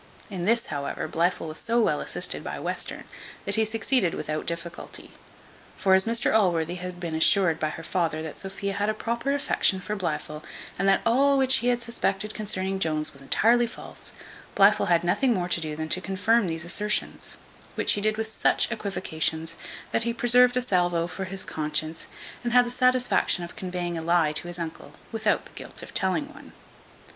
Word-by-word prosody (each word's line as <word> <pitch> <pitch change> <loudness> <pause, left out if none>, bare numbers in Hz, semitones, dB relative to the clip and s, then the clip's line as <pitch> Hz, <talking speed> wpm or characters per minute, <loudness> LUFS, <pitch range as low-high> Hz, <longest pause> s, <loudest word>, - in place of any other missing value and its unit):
In 180 -3 -3
this, 230 +3 +2
however, 140 +2 -3
Blifil 170 +1 0
was 155 0 -4
so 235 +1 +1
well 225 - +2
assisted - - -2
by - - -5
Western, - - -3 0.4
that - - -2
he 220 - +3
succeeded 220 -3 +1
without 155 0 -4
difficulty; 170 +1 -5 0.7
for 190 - +3
as 190 0 +5
Mr 230 +1 +2
Allworthy 175 -5 +2
had 180 0 -6
been 170 -2 -4
assured 165 +1 +4
by 155 - 0
her 165 - -7
father 160 -2 -1
that 160 - -6
Sophia 195 0 -4
had 205 +2 0
a 215 - 0
proper 235 +4 -2
affection 200 -8 +1
for 210 +3 -4
Blifil, 155 -4 -4 0.4
and 195 +1 +3
that 195 - +4
all 275 +4 +4
which 265 -1 +5
he 240 - -1
had 245 -1 +1
suspected 215 -3 -1
concerning 195 -2 -2
Jones 155 -4 0
was 140 - -10
entirely 235 - +3
false, 230 - -7 0.4
Blifil 200 +2 +5
had 170 -1 +3
nothing 235 +8 +2
more 175 -2 -1
to 170 - +2
do 155 -1 -3
than 155 +1 -4
to 185 - +1
confirm 195 +3 +1
these 165 0 -3
assertions; 210 +4 0 0.4
which - - +3
he 205 - +1
did 215 +1 +1
with 220 - -1
such 220 +2 +2
equivocations, 165 -6 -2 0.4
that - - +1
he 235 0 -1
preserved 245 +1 +4
a 250 - +1
salvo 175 -6 +1
for 190 +2 -5
his 190 0 -3
conscience; 155 +1 -2 0.4
and 240 0 -2
had 250 0 +6
the 240 - -3
satisfaction 250 -7 +3
of 170 - -8
conveying 180 -4 -3
a - - -5
lie 165 -2 +3
to 155 +3 -1
his 175 0 -2
uncle, 165 -2 -7 0.2
without 220 -2 0
the - - -15
guilt - - -6
of - - -11
telling - - 0
one. - - -14
190 Hz, 190 wpm, -26 LUFS, 170-225 Hz, 0.7 s, had